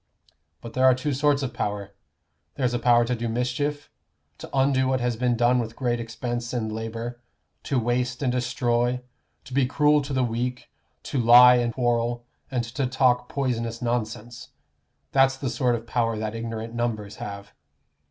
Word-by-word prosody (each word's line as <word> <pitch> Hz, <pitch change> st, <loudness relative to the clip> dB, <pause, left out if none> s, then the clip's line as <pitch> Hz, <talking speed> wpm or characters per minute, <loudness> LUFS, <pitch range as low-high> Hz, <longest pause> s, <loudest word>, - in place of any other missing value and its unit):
But 115 Hz, -, -9 dB
there 130 Hz, +2 st, +2 dB
are 130 Hz, -1 st, +6 dB
two 140 Hz, +3 st, -2 dB
sorts 145 Hz, +1 st, +2 dB
of 130 Hz, -, -3 dB
power. 100 Hz, -1 st, -3 dB, 0.6 s
There's 125 Hz, -3 st, 0 dB
a 120 Hz, -, 0 dB
power 120 Hz, 0 st, +4 dB
to 125 Hz, -, -1 dB
do 120 Hz, -1 st, -3 dB
mischief 130 Hz, +5 st, -2 dB, 0.5 s
to -, -, -9 dB
undo 135 Hz, -1 st, +2 dB
what 130 Hz, 0 st, +1 dB
has 120 Hz, -1 st, 0 dB
been 120 Hz, 0 st, 0 dB
done 120 Hz, +1 st, +3 dB
with 115 Hz, -1 st, -4 dB
great 120 Hz, -2 st, -1 dB
expense 120 Hz, +1 st, -4 dB
and 110 Hz, -3 st, -2 dB
labor, 115 Hz, +2 st, -5 dB, 0.4 s
to 140 Hz, -, 0 dB
waste 125 Hz, +2 st, -1 dB
and 130 Hz, -, +2 dB
destroy, 125 Hz, 0 st, 0 dB, 0.4 s
to 130 Hz, -, -12 dB
be 135 Hz, -1 st, +2 dB
cruel 150 Hz, +2 st, +3 dB
to 140 Hz, +1 st, -7 dB
the 130 Hz, -1 st, +1 dB
weak, 125 Hz, +1 st, -3 dB, 0.3 s
to 135 Hz, -, -2 dB
lie 125 Hz, +1 st, +8 dB
and 120 Hz, -1 st, 0 dB
quarrel, 120 Hz, -1 st, 0 dB, 0.2 s
and 125 Hz, -3 st, -1 dB
to 125 Hz, +3 st, -2 dB
talk 125 Hz, -1 st, +2 dB
poisonous 115 Hz, -4 st, -2 dB
nonsense. 120 Hz, -1 st, -3 dB, 0.6 s
That's 135 Hz, 0 st, +4 dB
the 135 Hz, -2 st, -3 dB
sort 125 Hz, 0 st, +1 dB
of 115 Hz, 0 st, -6 dB
power 115 Hz, -1 st, 0 dB
that 110 Hz, 0 st, -3 dB
ignorant 115 Hz, 0 st, -5 dB
numbers 110 Hz, -3 st, -3 dB
have. 100 Hz, -1 st, -8 dB
120 Hz, 170 wpm, -25 LUFS, 115-130 Hz, 0.6 s, lie